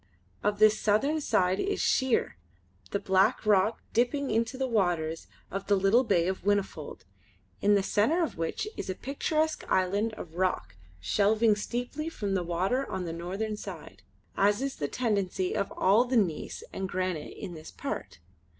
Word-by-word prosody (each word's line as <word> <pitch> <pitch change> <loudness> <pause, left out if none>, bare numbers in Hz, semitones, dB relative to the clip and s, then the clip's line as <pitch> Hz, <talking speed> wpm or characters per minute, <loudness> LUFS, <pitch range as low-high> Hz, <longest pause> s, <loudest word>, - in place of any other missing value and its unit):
Of 210 0 0
this 215 0 +6
the - - -7
southern 275 +10 +2
side 185 -7 +2
is 400 +1 -1
sheer, 260 - +2 0.5
the - - 0
black 190 +3 +2
rock 210 +1 +3
dipping 255 +4 +1
into 230 +4 0
the 265 - 0
waters 175 -9 0 0.2
of 195 0 -4
the 205 - +4
little 195 +6 +4
bay 180 -7 +2
of 190 0 -2
Whinnyfold, 200 -6 -1 0.6
in 205 0 +4
the 200 - +2
centre 275 - +2
of 325 - -3
which 165 - -2
is - - -5
a 185 - -2
picturesque 310 +5 -1
island 200 +4 +1
of 170 -4 -9
rock 185 - -1 0.2
shelving 210 - +3
steeply 245 +9 -3
from 205 -11 -3
the 190 - +1
water 185 +10 -1
on 190 -1 -3
the 165 - -4
northern 195 +6 -3
side, 160 - -9 0.3
as 205 +2 +3
is 275 0 -3
the 145 - -1
tendency 200 - -1
of 200 - -1
all 210 +6 +4
the 250 0 +1
gneiss 175 -8 -1
and 190 -1 -3
granite 185 -4 -3
in 180 - -6
this 155 -1 -9
part. 280 +1 -5
205 Hz, 170 wpm, -29 LUFS, 185-235 Hz, 0.6 s, this